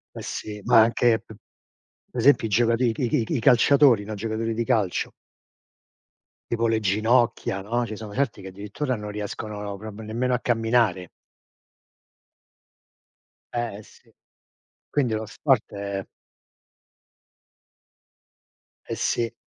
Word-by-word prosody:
Eh - - -6
sì. 105 -1 -6
Ma 120 -2 +6
anche 115 -1 +3
p 110 - -14 0.8
per 120 - -2
esempio 135 -2 +5
i - - -5
giocati 115 +2 +3
i - - -1
c - - -13
i 120 - +1
c - - -11
i 115 - +2
c - - -12
i 140 -7 0
calciatori, 125 -1 +5
no, 110 - -6
i - - -4
giocatori 115 +1 -2
di 115 +1 -1
calcio. 110 -8 0 1.4
Tipo 115 0 +1
le 110 -1 +1
ginocchia, 110 0 +1
no, 120 +3 -1
ci 110 - -6
sono 105 -1 -8
certi 125 -7 -1
che 95 - -7
addirittura 105 +8 -4
non 105 -1 -6
riescono 105 0 -5
proprio 110 +1 -7
nemmeno 125 +3 -1
a - - +1
camminare. 115 -6 +1 2.5
Eh 120 -4 -2
eh 105 - -10
sì. - - -21 0.8
Quindi 130 -6 +1
lo 110 0 -2
sport 130 +1 +1
è 100 -1 -4 2.8
Eh - - -4
sì. 115 0 0
110 Hz, 140 wpm, -25 LUFS, 105-120 Hz, 2.8 s, Ma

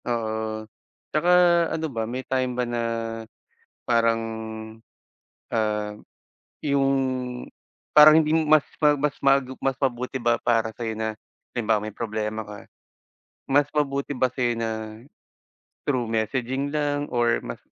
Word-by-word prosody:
Oo, 110 -2 -2 0.5
tsaka 155 +4 +2 0.5
ano 160 - -2
ba, 110 -1 -2
may 130 +2 -4
time 130 -2 -1
ba 125 - +1
na 120 0 -2 1.1
parang, 115 -1 +3 1.3
ah, 105 -1 -1 0.7
yung 140 -1 +2 1.0
parang 150 0 +9
hindi 155 - -2 0.2
mas 155 -1 +6 0.2
ma-mas 150 -1 +2
magup 135 -1 +2
mas 135 0 0
mabuti 125 0 -1
ba 120 0 +2
para 115 -2 +1
sa 120 - -3
iyo 110 - -2
na 110 0 -3 0.3
halimbawa, 110 -3 0
may 110 - -4
problema 110 -1 -3
ka, 105 -1 -11 0.8
mas 145 +1 +3
mabuti 140 -2 -1
ba 130 0 +1
sa' 130 - -5
yo 120 -1 +1
na 115 -1 -1 1.2
through 125 -5 0
messaging 130 +5 -1
lang 145 -1 0
or 120 -1 +3
mas - - -7
120 Hz, 130 wpm, -25 LUFS, 110-140 Hz, 1.3 s, parang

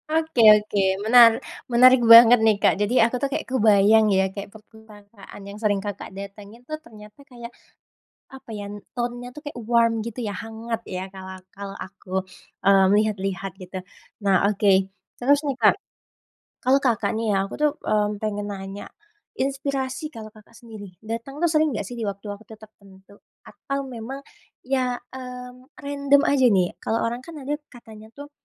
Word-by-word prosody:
Oke 320 -5 0 0.2
oke 210 -1 -2 0.2
menar 230 0 +7 0.3
menarik 250 +1 +6
banget 235 +1 +9
nih 220 -2 +3
Kak - - +3
jadi 225 +3 +3
aku 235 - -4
tuh 280 - 0
kayak 290 - -3
kebayang 215 -3 +4
ya, 190 -1 +3
kayak 200 0 -7
perpustakaan 210 -1 -16
yang 200 +1 -9
sering 210 -2 +1
Kakak 205 -1 -6
datengin 200 +4 -11
tuh 310 +3 -7
ternyata 215 -4 -15
kayak, 245 -4 -11 0.8
apa 265 -2 -13
ya 205 - -6 0.3
tone-nya 245 0 -4
tuh 300 - -9
kayak 290 -4 -7
warm 230 -1 +3
gitu 230 +2 -7
ya 205 - -4
hangat 225 +2 -6
ya, 185 0 -4
kalau 190 0 -9 0.2
kalau 200 0 -8
aku, 190 -1 -6 0.4
eee, 195 -1 +5
melihat-lihat 195 -2 -1
gitu. 185 +1 -8 0.5
Nah 195 0 +3
oke. 195 -2 +2 0.3
Terus 280 +3 +3
nih 280 -2 -1
Kak, 215 - +5 0.9
kalau 265 +2 +4
Kakak 245 -6 0
nih 220 -2 0
ya - - +2
aku 195 - -8
tuh, 300 0 +3
mmm, 210 -1 -1
pengen 205 -1 -3
nanya, 195 +1 -8 0.5
inspirasi 270 -1 -3
kalau 220 -1 -9
Kakak 215 +1 -20
sendiri 215 -5 -12
datang 230 +5 -6
tuh 345 - +4
sering 310 0 +2
enggak 215 - -3
sih 245 - -8
di 225 - -3
waktu-waktu 205 +2 -7
tertentu? 200 -2 -19 0.3
Atau 275 0 -6
memang 260 +2 -8 0.4
ya, 255 -1 -1 0.2
mmm, 250 +1 -10
random 280 0 +2
aja 270 -3 +3
nih? 185 -5 +2
Kalau 225 - -1
orang 235 +1 -3
kan 335 - -10
ada 275 +2 -4 0.2
katanya 220 -3 -14
tuh, 285 +1 -11
225 Hz, 160 wpm, -23 LUFS, 205-255 Hz, 0.9 s, banget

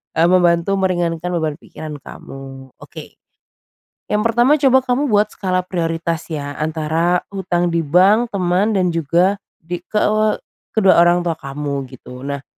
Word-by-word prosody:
eee, 165 +1 +4
membantu 175 +1 +3
meringankan 175 -2 -1
beban 155 -3 -2
pikiran 150 -2 -9
kamu. 135 -1 -11
Oke. - - -12 0.9
Yang 210 0 +2
pertama, 245 +6 +3
coba 265 -2 +4
kamu 250 +1 0
buat 210 -2 +2
skala 185 -2 -1
prioritas 165 -2 -3
ya 145 -3 -5
antara 160 +3 0
hutang 175 -3 -1
di 170 - +1
bank, 185 +9 +3
teman, 185 +4 +1
dan 180 -2 +1
juga 170 +5 +1 0.2
di 175 +2 -5
ke 180 +4 -16 0.8
kedua 195 -5 +5
orang 175 +1 +4
tua 165 -2 -2
kamu 140 -1 -4
gitu. 125 0 -12
Nah, 140 0 -5
175 Hz, 145 wpm, -18 LUFS, 155-190 Hz, 0.9 s, kedua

